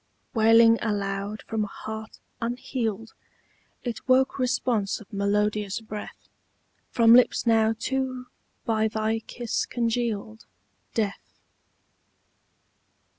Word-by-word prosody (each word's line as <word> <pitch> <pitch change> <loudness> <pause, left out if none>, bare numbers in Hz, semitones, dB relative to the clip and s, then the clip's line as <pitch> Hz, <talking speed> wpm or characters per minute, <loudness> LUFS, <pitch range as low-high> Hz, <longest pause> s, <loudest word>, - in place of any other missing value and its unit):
Wailing 225 0 +6
aloud 200 -1 -2
from 220 -1 -2
a - - -3
heart 220 +2 -8 0.2
unhealed, 230 -2 -3 0.7
It 240 -1 -5
woke 260 +1 +3
response 245 -5 0
of 215 - -16
melodious 205 0 0
breath 215 -2 -9 0.6
From 230 -1 +5
lips 250 +1 +5
now 225 -1 +3
too 260 0 -2 0.4
by 220 -1 +2
thy 220 +1 -1
kiss 235 0 -3
congealed, 230 - -2 0.5
Death. 210 -2 -3
225 Hz, 95 wpm, -26 LUFS, 210-235 Hz, 0.7 s, Wailing